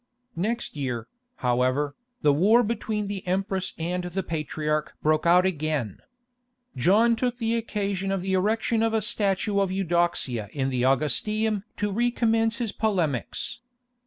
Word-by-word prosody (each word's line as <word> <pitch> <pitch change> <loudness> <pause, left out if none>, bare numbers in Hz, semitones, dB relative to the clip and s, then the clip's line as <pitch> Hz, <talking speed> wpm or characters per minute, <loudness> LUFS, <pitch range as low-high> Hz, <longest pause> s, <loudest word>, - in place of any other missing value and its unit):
Next 225 +4 -2
year, 125 -5 -3 0.4
however, 130 +4 +1 0.3
the 145 -1 +5
war 210 +11 +5
between 215 -1 -2
the 200 -1 -4
empress 190 0 -1
and 180 +2 -2
the 180 +2 -3
patriarch 150 -1 -2
broke 155 +2 +2
out 180 +2 +6
again. 155 - -1 0.8
John 210 - +4
took 245 +1 -1
the 230 -1 0
occasion 200 -4 -2
of 195 -2 -1
the 190 +1 -2
erection 220 +4 +1
of 225 0 +1
a 220 - +1
statue 200 0 +1
of 195 -1 +1
Eudoxia 175 - 0
in 135 -2 -1
the 125 -1 -1
Augustaeum 205 - +1
to 205 0 -1
recommence 225 0 +1
his 235 -5 -2
polemics. 185 - -1
190 Hz, 140 wpm, -26 LUFS, 150-220 Hz, 0.8 s, out